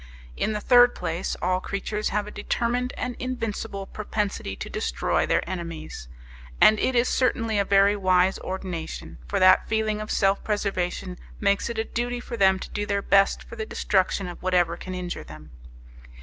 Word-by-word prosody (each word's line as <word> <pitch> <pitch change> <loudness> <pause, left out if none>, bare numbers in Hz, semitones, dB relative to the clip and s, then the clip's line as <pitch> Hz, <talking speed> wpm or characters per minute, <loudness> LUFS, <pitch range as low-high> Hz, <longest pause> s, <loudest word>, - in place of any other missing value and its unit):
In 215 - -1
the 210 - -2
third 245 +2 +6
place, 170 +1 -3
all 185 0 +2
creatures 210 +3 -3
have 210 0 -1
a 210 - -8
determined 245 +3 -1
and 250 -1 -3
invincible 225 -5 -4
propensity 210 0 -3
to - - -6
destroy - - -1
their - - +1
enemies; 165 - -6 0.5
and 215 0 +6
it 260 - +1
is 240 +1 +3
certainly 230 -4 +1
a - - +3
very 200 +1 +4
wise 185 -1 +2
ordination, 185 -3 -6
for 200 - -1
that 185 0 +5
feeling 220 -1 0
of 215 - -6
self 195 0 +2
preservation 185 -3 -2 0.2
makes 200 +2 +1
it 235 - -5
a 220 - +1
duty 240 +2 -3
for 240 0 -6
them 190 -3 +4
to - - -8
do 205 0 -3
their 200 -1 0
best 195 0 +3
for - - -11
the 220 - -3
destruction 190 -1 0
of 175 - -8
whatever 180 -2 +2
can 185 +1 -7
injure 180 -1 -5
them. 75 0 -12
200 Hz, 175 wpm, -25 LUFS, 185-220 Hz, 0.5 s, third